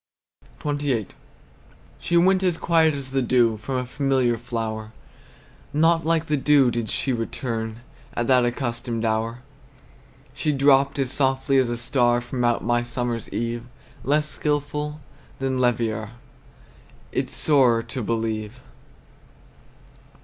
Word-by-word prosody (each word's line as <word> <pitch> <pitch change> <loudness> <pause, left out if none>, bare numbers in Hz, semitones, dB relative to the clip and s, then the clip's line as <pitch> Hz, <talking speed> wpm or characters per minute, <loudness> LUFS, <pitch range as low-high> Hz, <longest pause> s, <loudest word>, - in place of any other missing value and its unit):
XXVIII. 145 -7 -1 0.9
She 170 - +1
went 185 +2 +4
as 180 -3 +1
quiet 160 -3 +3
as 135 -2 -6
the 135 0 +1
dew 120 -3 +3
From 125 +5 -5
a 125 0 -1
familiar 130 -2 +1
flower. 110 -2 -4 0.8
Not 165 +2 +3
like 165 -1 +2
the 150 -2 0
dew 140 -2 +4
did 115 -2 -3
she 135 - -1
return 115 -1 -3 0.3
At 120 - 0
the 125 0 +4
accustomed 120 -2 -2
hour! 115 +2 -1 0.9
She 150 - -1
dropt 140 0 +4
as 135 -2 -1
softly 135 0 +1
as 130 -2 +3
a 120 - -2
star 120 0 +2
From 120 +1 -4
out 120 0 +1
my 120 0 +2
summer's 120 -1 -3
eve; 115 +1 -2 0.4
Less 150 +2 +1
skilful 150 0 -2 0.4
than 130 -1 -1
Leverrier 115 -3 0 1.0
It's - - -2
sorer 125 -6 +4
to 130 - -5
believe! 110 +1 -3
125 Hz, 125 wpm, -24 LUFS, 115-145 Hz, 1.0 s, went